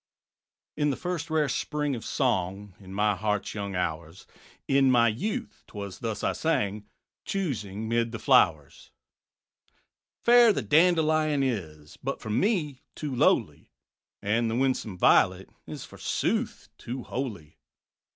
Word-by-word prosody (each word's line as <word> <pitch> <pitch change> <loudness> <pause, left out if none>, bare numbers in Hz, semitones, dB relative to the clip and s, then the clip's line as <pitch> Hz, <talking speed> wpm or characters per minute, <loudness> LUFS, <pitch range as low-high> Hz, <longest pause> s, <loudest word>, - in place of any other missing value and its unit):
_In 150 0 +2
the 140 - 0
first 175 -3 -4
rare 155 -2 +2
spring 150 +1 -2
of 115 - -7
song, 95 +2 -1
In 95 -2 -13
my 105 +1 +1
heart's 105 +1 -2
young 100 -2 -4
hours, 85 0 -4 0.4
In 135 -1 +4
my 120 -2 +5
youth 215 - -3
't - - -13
was 100 -2 -6
thus 110 -2 -4
I - - +1
sang, 105 -10 -1 0.4
Choosing 110 - -3
'mid 115 0 0
the 115 - -4
flowers: - - +2 0.8
_ - - -45
_"Fair 240 -1 +3
the 140 - -2
Dandelion 155 - +3
is, 80 - -4
But - - -3
for 110 - -6
me 150 - 0
too 145 -4 -4
lowly; - - +1 0.5
And 115 +3 +1
the 110 - -1
winsome 125 -6 0
Violet - - +3 0.2
Is, - - -7
forsooth, - - -2
too 125 +1 -6
holy. 110 - -6
115 Hz, 140 wpm, -27 LUFS, 100-150 Hz, 0.8 s, my